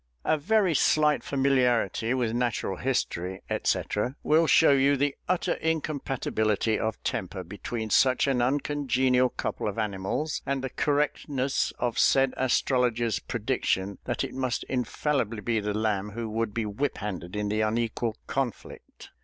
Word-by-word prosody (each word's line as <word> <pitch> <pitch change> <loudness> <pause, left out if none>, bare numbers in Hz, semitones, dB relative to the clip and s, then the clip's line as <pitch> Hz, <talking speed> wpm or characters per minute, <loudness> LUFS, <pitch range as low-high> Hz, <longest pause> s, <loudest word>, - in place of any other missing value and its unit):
A - - +3
very 190 +4 +2
slight 150 +1 +3
familiarity 130 -3 +1
with 120 -3 0
Natural 120 -6 -1
History, 95 -8 -2 0.2
&c., - - +3 0.4
will 160 +2 +4
show 160 - +6
you 140 +1 +4
the 140 +1 0
utter 185 -1 +1
incompatibility 135 -9 -1
of 110 0 -2
temper - - -3
between 110 -3 -5
such 130 +2 +4
an 135 -3 +1
uncongenial 130 -1 +2
couple - - -3
of 105 - -3
animals, 105 +8 -2
and 135 -1 -2
the 130 - -3
correctness 145 -2 0
of 120 -2 -1
said 135 -1 +4
astrologer's 120 -3 +1
prediction 95 +1 -2
that - - -1
it - - -5
must 130 -2 -2
infallibly 125 -2 -1
be 115 +1 0
the 105 0 -2
Lamb 105 -2 0
who 115 0 -4
would 110 0 -2
be 115 +2 -2
whiphanded 100 - -3
in 105 0 -1
the 105 +1 0
unequal 115 +1 -1
conflict. 135 -5 -5
125 Hz, 140 wpm, -27 LUFS, 110-140 Hz, 0.4 s, show